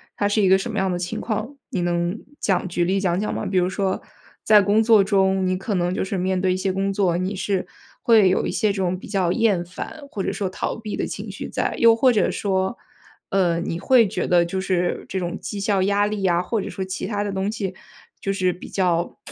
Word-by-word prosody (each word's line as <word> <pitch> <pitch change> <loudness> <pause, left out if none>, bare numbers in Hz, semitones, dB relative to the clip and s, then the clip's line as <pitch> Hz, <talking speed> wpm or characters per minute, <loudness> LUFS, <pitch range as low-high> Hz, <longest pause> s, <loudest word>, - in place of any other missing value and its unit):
它 205 - +1
是 205 +1 +2
一 190 - +4
个 190 - +6
什 210 +5 -4
么 215 - -4
样 190 -1 +1
的 180 - -1
情 175 0 -4
况， 220 +4 -3
你 185 - -2
能 175 +2 0 0.2
讲 190 -2 0
举 175 0 0
例 190 +3 +1
讲 180 -2 0
讲 210 - -2
吗？ - - -3
比 190 - -1
如 180 0 +2
说 190 0 -1 0.4
在 210 -1 +6
工 205 +3 +3
作 220 -3 +6
中， 190 -1 +2
你 185 0 +1
可 195 +2 -3
能 175 0 0
就 - - -1
是 190 +1 -3
面 185 +1 0
对 185 -1 +2
一 - - -1
些 190 0 -1
工 195 +1 0
作， 190 -4 +1
你 185 +3 -2
是 190 0 -1 0.3
会 220 -5 +5
有 185 - +1
一 - - -2
些 215 -3 +1
这 - - -7
种 185 -1 0
比 - - -11
较 190 -4 0
厌 205 -4 +2
烦 185 - -8
或 200 - -3
者 - - -1
说 195 -2 -2
逃 185 - -3
避 215 -2 -5
的 - - -2
情 - - -6
绪 - - -6
在？ - - -1
又 230 -1 +6
或 255 +2 +4
者 215 - +2
说 190 +2 -1 0.5
呃， 175 -4 +2
你 170 0 -3
会 240 +1 +5
觉 - - -2
得 175 -1 +4
就 190 +3 -3
是 180 -2 -1
这 190 - -2
种 175 +2 -4
绩 205 - -5
效 200 -1 +1
压 200 +1 +2
力 210 -1 -3
呀， 175 -2 +3
或 210 +4 -2
者 - - -5
说 190 - -4
其 190 +2 -4
他 205 -1 -1
的 205 - -3
东 195 +1 -1
西 195 -4 -3 0.5
就 195 - -2
是 185 -2 +1
比 180 - -11
较 175 -3 0
190 Hz, 270 characters per minute, -22 LUFS, 185-205 Hz, 0.5 s, 个